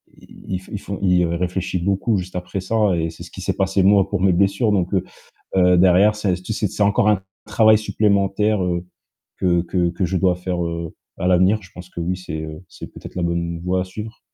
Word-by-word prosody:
i 95 -1 -7
il 105 - -4
fond 100 0 -6
il 90 -2 +3
ré 85 0 -2
réfléchit 90 +1 -2
beaucoup 100 +5 0
juste 90 0 -6
après 90 +2 -4
ça 105 0 +1
et 80 0 -1
c'est 80 - -10
ce - - -12
qui - - -9
s'est - - -1
passé 95 0 +1
moi 100 -1 +5
pour 100 -3 -2
mes 95 - +4
blessures 100 +4 +2
donc, 95 -1 0
heu 95 - +2 0.5
heu, 90 -1 +5
derrière 95 +4 +5
c'est 100 -4 0
c'est 105 +3 -2
c'est 105 - -1
encore 100 +1 +3
un 105 -3 +2 0.2
travail 110 +1 +5
supplémentaire, 105 -1 +1
heu, 90 0 -2 0.5
que 85 -2 +2
que 90 0 0
que 90 +2 -1
je 95 +2 -2
dois 90 -1 +2
faire, 90 -1 -3
heu, 85 -1 -5 0.2
à 90 - -1
l'avenir. 95 +4 +4
Je 95 - -16
pense 90 0 -11
que 85 - -9
oui, 90 +2 -1
c'est, 80 -4 -6
heu, 80 +3 -8
c'est - - -9
peut-être - - -11
la 90 - -2
bonne 85 0 -2
voie 90 +1 0
à - - -1
suivre. 110 +5 -8
95 Hz, 225 wpm, -21 LUFS, 90-100 Hz, 0.5 s, moi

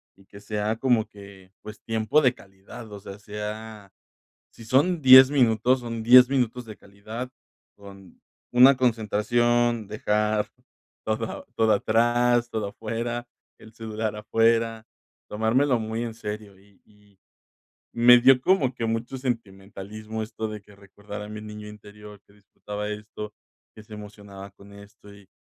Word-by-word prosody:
y 95 - -23
que 100 - -14
sea 105 +1 -3
como 120 -3 +2
que, 100 -3 -15
pues, 105 0 -11
tiempo 115 +7 +1
de 125 -3 +3
calidad, 100 +4 -14
o 100 - -8
sea, 100 +1 -11
sea 105 0 -8 0.6
si 115 - -15
son 145 +9 +2
10 130 -1 +9
minutos, 125 -2 +2
son 115 -2 -5
10 125 +2 +8
minutos 125 -2 -1
de 110 -2 -11
calidad 110 +5 -9 0.5
con 100 -2 -15 0.3
una 130 +2 +7
concentración, 120 0 +1
dejar 105 0 -1 0.6
todo 110 +1 -4
todo 110 -1 +3
atrás, 120 +3 +2
todo 105 -2 -3
afuera, 115 +3 -5 0.3
el 110 - -16
celular 110 -1 -4
afuera, 115 +1 0 0.4
tomármelo 120 +5 +1
muy 110 +1 -4
en 115 -2 -5
serio 105 -3 -8
y 100 -1 -26
y 105 -2 -26 0.8
me 120 +1 +7
dio 130 +1 +5
como 135 -6 +1
que 115 - -4
mucho 115 +3 -3
sentimentalismo, 110 -2 -6
esto 110 0 -5
de 105 -1 -7
que 100 0 -20
recordara 105 +1 -10
a - - -12
mi 105 0 -8
niño 105 0 -9
interior 105 -1 -13
que 100 - -24
disfrutaba 105 +1 -8
esto, 105 0 -8 0.4
que 110 - -13
se 105 0 -12
emocionaba 100 -1 -11
con 100 +1 -18
esto 100 0 -15
y 100 -2 -18
110 Hz, 145 wpm, -25 LUFS, 105-120 Hz, 0.8 s, 10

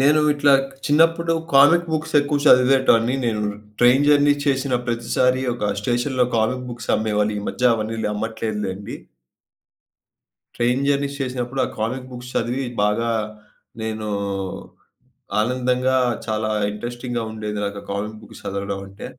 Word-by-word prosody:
నేను 150 +3 +4
ఇట్లా 145 -1 +3 0.3
చిన్నప్పుడు 165 +2 +3 0.2
కామిక్ 155 +6 +6
బుక్స్ 155 0 -2
ఎక్కువ 145 0 -1
చదివేటోన్ని 125 -2 +5
నేను. 110 -2 0 0.3
ట్రైన్ 125 +3 +5
జర్నీ 145 0 +5
చేసిన 135 -2 0
ప్రతిసారి 125 +2 +1
ఒక 105 -4 -1
స్టేషన్‌లో 125 +3 0
కామిక్ 125 +3 0
బుక్స్ 120 -1 -4
అమ్మేవాళ్లీ 105 -1 0
మధ్య 125 -1 +2
అవన్నీ 110 +1 -3 0.2
అమ్మట్లేదు 110 0 -3
లెండి. 95 +2 -6 1.6
ట్రైన్ 125 +3 +1
జర్నీస్ 140 0 0
చేసినప్పుడు 130 0 -3
ఆ - - -5
కామిక్ 125 +4 -3
బుక్స్ 125 0 -9
చదివి 130 +3 -1 0.2
బాగా 105 +3 +1 0.7
నేను 110 -1 -4 1.3
ఆనందంగా 125 +2 +1 0.3
చాలా 110 0 -1 0.2
ఇంట్రెస్టింగ్‌గా 120 +2 -4
ఉండేది. 105 -1 -5
నాకు 100 0 -4
ఆ - - -17
కామిక్ 105 +2 -4
బుక్స్ - - -13
చదవడం 100 0 -3
అంటే. 100 +1 -10
125 Hz, 125 wpm, -21 LUFS, 110-135 Hz, 1.6 s, కామిక్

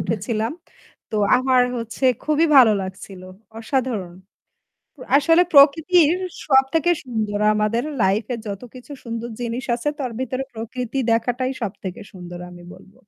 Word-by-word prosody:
উঠেছিলাম। 220 +2 -2 0.6
তো 215 - -2 0.2
আমার 255 0 +3
হচ্ছে 230 +3 -5 0.2
খুবই 310 +1 +2
ভালো 240 -5 +8
লাগছিল। 190 0 -9 0.4
অসাধারণ। 225 -7 -2 1.0
আসলে 330 +5 +4
প্রকৃতির 315 +4 +5 0.3
সবথেকে 280 +5 +3
সুন্দর 215 -4 -3 0.2
আমাদের 215 +3 0
আমার 300 -2 -6
লাইফ 195 +4 +2
এ - - -3
যতকিছু 245 +7 -9
সুন্দর 230 0 -5
জিনিস 240 +2 -4
আছে 240 +5 -3
তার 255 -3 -3
ভিতরে 260 +1 -3
প্রকৃতি 240 +3 -5
দেখাটাই 245 +3 0
সবথেকে 190 -3 -5
সুন্দর 175 -2 -9
আমি 175 0 -13
বলব। 195 - -17
240 Hz, 130 wpm, -21 LUFS, 215-270 Hz, 1.0 s, ভালো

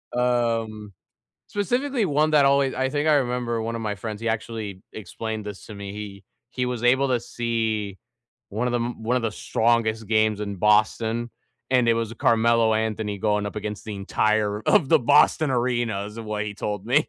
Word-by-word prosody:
Um, 115 -4 0 0.5
specifically 245 +5 -1
one 155 -2 +2
that 145 -2 +5
always 140 -1 +3
I 130 0 0
think 145 +2 0
I 155 - +5
remember 120 -4 0
one 115 +1 -3
of - - -5
my 105 -2 -2
friends, 105 +1 -6
he 115 - -2
actually 110 -3 -4
explained 110 +1 -6
this 100 -2 -8
to 105 - -9
me. 100 0 -7
He 100 -2 -8 0.3
he 125 -1 -2
was 125 -2 -3
able 130 +3 +3
to 125 -2 +1
see 110 -5 -2 0.5
one 110 +5 -2
of - - -2
the 120 - +1
m 120 -1 -4
one 125 +3 +1
of 125 - 0
the 115 -2 -1
strongest 110 -1 0
games 110 -1 +2
in 100 -2 -4
Boston, 110 +3 +2 0.4
and 125 -2 +3
it 115 - +5
was 115 -1 -2
Carmelo 115 0 +3
Anthony 110 -2 -2
going 105 0 0
up 105 - -7
against 105 0 -5
the 110 - -5
entire 105 +1 0
of 190 -10 +3
the - - +6
Boston 145 +3 +4
Arena, 120 -5 0
is 105 +2 -10
what 105 -1 -3
he 105 -1 -5
told 105 -1 -4
me. 140 +6 +2
115 Hz, 195 wpm, -24 LUFS, 105-125 Hz, 0.5 s, the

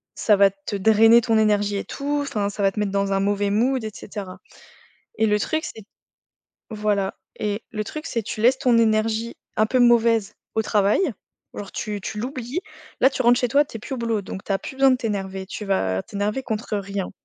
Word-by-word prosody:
«Ça 210 - +3
va 200 0 +6
te 195 +1 -7
drainer 220 +3 +6
ton 225 -1 +1
énergie 205 -1 +2
et - - -3
tout, 290 +1 -2
enfin, 210 -8 -2
ça 205 0 -4
va 195 - +4
te 210 - -5
mettre 205 -2 0
dans 200 0 0
un 195 - +1
mauvais 205 +1 0
mood» 245 +5 +1
et 215 - -4
cetera 195 -3 -8 0.8
et 220 - +3
le 210 -1 +2
truc 315 +9 -1
c'est 220 - -8 0.9
voilà 210 -3 -1 0.2
et 210 +1 -2
le 215 -1 -3
truc 305 +8 -7
c'est 230 - -2
tu 215 +1 -5
laisses 255 +3 +4
ton 245 -3 +3
énergie 225 +1 +1 0.2
un 215 - +3
peu 255 +4 +1
mauvaise 230 -3 +4 0.2
au 220 - +3
travail, 205 - +2 0.5
genre, 200 - -7
tu 210 -2 -4
tu 210 - -5
l'oublies. 255 +5 -4 0.4
Là, 265 - +6
tu 265 - -2
rentres 240 0 +5
chez 245 - +1
toi, 285 +5 +4
tu 250 - -9
es - - -9
plus 270 - -5
au - - -5
boulot 230 -3 -1
donc 190 0 -7
tu - - -14
as 195 - +1
plus - - -8
besoin 270 0 +5
de 255 - +3
t'énerver, 195 -5 -4
tu 210 - -6
vas 95 - 0
t'énerver 210 +5 -3
contre 220 -3 -3
rien. 200 -1 -4
215 Hz, 220 wpm, -23 LUFS, 200-235 Hz, 0.9 s, va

